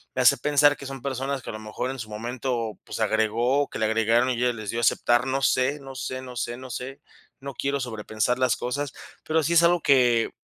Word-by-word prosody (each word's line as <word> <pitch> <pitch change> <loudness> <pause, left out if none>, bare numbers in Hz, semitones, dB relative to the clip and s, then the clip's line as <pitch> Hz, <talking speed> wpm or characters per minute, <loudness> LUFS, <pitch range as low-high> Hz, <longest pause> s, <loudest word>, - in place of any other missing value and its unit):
Me - - +1
hace - - +6
pensar 145 0 +4
que 140 - -10
son 135 -1 -7
personas 135 0 -3
que - - -7
a - - -5
lo 110 - -6
mejor 110 +4 -4
en 135 - -7
su 110 - -6
momento, 115 0 -3
pues - - -6
agregó, 115 +6 +1
que - - -6
le 110 - +2
agregaron 115 +3 +2
y 125 - -1
ya 125 0 +2
les 110 -2 -7
dio 115 - -2
aceptar, 120 +1 +2
no 135 +1 0
sé, 135 +2 +2
no 135 -1 -10
sé, 130 0 -4
no 125 -1 -9
sé, 120 0 -3
no 130 0 -10
sé, 125 +3 -6 0.4
no 140 0 -7
quiero 140 0 -1
sobrepensar 110 0 -2
las 130 -3 +3
cosas, 140 +2 -3 0.3
pero 160 +1 +1
sí 170 +4 +1
es 170 - +6
algo 170 -1 +4
que 120 -4 +4
125 Hz, 235 wpm, -25 LUFS, 115-135 Hz, 0.4 s, hace